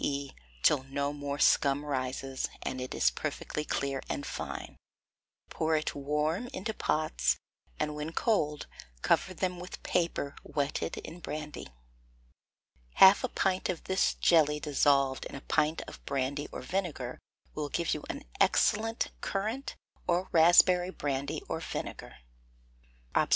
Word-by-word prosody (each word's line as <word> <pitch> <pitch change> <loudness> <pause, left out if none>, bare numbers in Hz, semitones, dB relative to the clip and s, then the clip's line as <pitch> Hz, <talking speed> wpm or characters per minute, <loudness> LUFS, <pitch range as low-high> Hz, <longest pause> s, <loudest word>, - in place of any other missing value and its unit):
e._ 140 -1 -1 0.3
till 145 - +5
no 140 +1 -2
more 145 -1 -4
scum 145 0 +4
rises, 135 -1 -2
and 130 0 -3
it 130 - -5
is - - +4
perfectly 150 - -3
clear 140 -2 -1
and 140 - -3
fine; - - -5 0.8
pour 160 0 +1
it 155 - -1
warm 150 - -1
into 210 +4 -3
pots, 65 - +1 0.4
and 150 - 0
when 150 +2 -4
cold, 155 -8 +1 0.4
cover - - +3
them 180 0 -2
with 180 +1 -8
paper 165 -5 0
wetted 145 -1 -2
in 170 - -9
brandy. 150 -2 -6 1.3
Half 190 +5 +8
a - - +2
pint 190 -3 0
of 180 -3 -2
this 190 0 +1
jelly 150 -3 +4
dissolved 140 -2 +2
in - - -7
a 135 - -7
pint 150 +2 +1
of - - -11
brandy 140 +2 -1
or - - -6
vinegar 170 -10 -3 0.3
will 150 -1 -3
give 170 +2 0
you 150 - -4
an - - -4 0.2
excellent 225 +2 +2
currant 220 +7 -2 0.3
or 180 +1 +1
raspberry 175 +2 +6
brandy 140 -5 -3
or - - -2
vinegar. - - -6 1.0
_Obs. - - +3
150 Hz, 140 wpm, -30 LUFS, 140-180 Hz, 1.3 s, Half